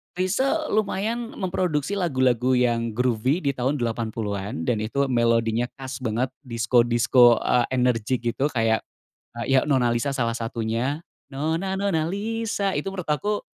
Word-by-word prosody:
Chrisye 265 - 0
lumayan 220 +3 -1
memproduksi 180 -3 -1
lagu-lagu 130 - +2
yang 120 -2 +1
groovy 125 +6 +1
di 140 - +2
tahun 130 +3 -1
80-an 110 - -3
dan 115 -3 +1
itu 140 +6 0
melodinya 115 0 +2
khas 135 0 -6
banget, 120 +1 -1 0.2
disko-disko, 120 0 +4
eee, 125 -1 +3
energik 125 -1 +1
gitu, 135 +4 0
kayak, 115 -3 +1 0.6
eee, 135 +3 0
ya - - +6
"Nona 130 -5 +2
Lisa" 140 +4 0
salah 120 -4 -1
satunya. 115 +5 -2 0.3
"Nona, 165 +7 -2
nona, 195 -6 +1
Lisa," 210 -1 -2
itu 195 - -2
menurut 180 -5 -6
aku, 205 +8 0
130 Hz, 135 wpm, -24 LUFS, 115-175 Hz, 0.6 s, ya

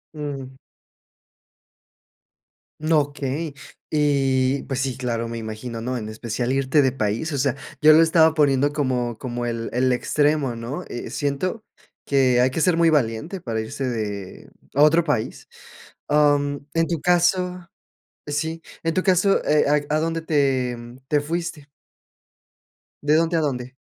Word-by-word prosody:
Mm. 135 -3 -6 2.2
No, 155 0 +3
okey. 145 +1 -4 0.4
Eh, 135 -3 +2
pues, 135 -2 -2
sí, 130 -2 -2
claro, 115 -2 -2
me 115 - -5
imagino, 115 +1 -6
¿no? 125 +2 -2
En 110 -2 -5
especial 115 +3 -3
irte 135 +2 +2
de 130 - +2
país, 115 +6 -2
o 140 - -1
sea, 135 -1 +1 0.3
yo 155 0 +8
lo 160 - +7
estaba 160 -1 +5
poniendo 145 -2 +3
como 125 -5 -1
como 120 0 -4
el 115 -1 -3
el 130 +1 +2
extremo, 145 0 +1
¿no? 120 +10 -5
Eh, 120 - -6
siento 145 +10 -2 0.4
que 130 -3 +3
hay 125 - +4
que 145 +5 -2
ser 175 0 +3
muy 170 -1 +4
valiente 150 - 0
para 115 -5 -3
irse 110 +5 -5
de 105 -5 -5 0.2
a 140 - +2
otro 165 +3 +5
país. 145 -9 -2 0.6
Mm, 145 -1 +3 0.2
en 165 0 +1
tu 165 -3 -2
caso, 180 0 +1 0.6
sí, 160 +3 -3 0.2
en 165 0 -1
tu 185 - +1
caso, 190 +1 +3
¿Eh, 150 - +3 0.2
a 150 - 0
a - - +1
dónde 165 0 -2
te 135 -6 +1 0.3
te 150 -1 +2
fuiste? 165 -1 -4 1.4
¿De 150 +1 +3
dónde 165 +1 +2
a - - +2
dónde? 130 -3 -3
140 Hz, 150 wpm, -23 LUFS, 125-160 Hz, 2.2 s, yo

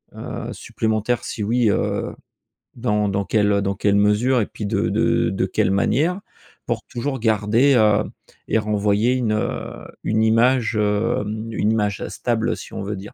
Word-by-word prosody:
heu, - - -6
supplémentaires? 110 +2 -2
Si 110 - -5
oui, 115 +1 +2
heu, - - -1 0.6
dans 105 -4 0
dans 100 0 -1
quelle 105 -2 +2
dans 100 0 -1
quelle 100 +1 +1
mesure 105 +5 +3
et - - 0
puis 105 - -7
de - - 0
de - - +2
de 95 -1 0
quelle 95 - +1
manière? 155 - +1 0.5
Pour 115 -2 -2
toujours 135 +1 -4
garder, 110 +5 +3
heu, 105 -2 +4 0.4
et - - +2
renvoyer 105 +2 +1
une 120 -4 0
heu, 105 - -3 0.2
une 110 0 +1
image, 115 +1 +3
hem, 110 +1 -1
une 110 0 +1
image 105 -3 -1
stable - - -1
si - - -10
on - - -4
veut 105 +1 -3
dire. 100 +2 -10
110 Hz, 165 wpm, -21 LUFS, 105-120 Hz, 0.6 s, heu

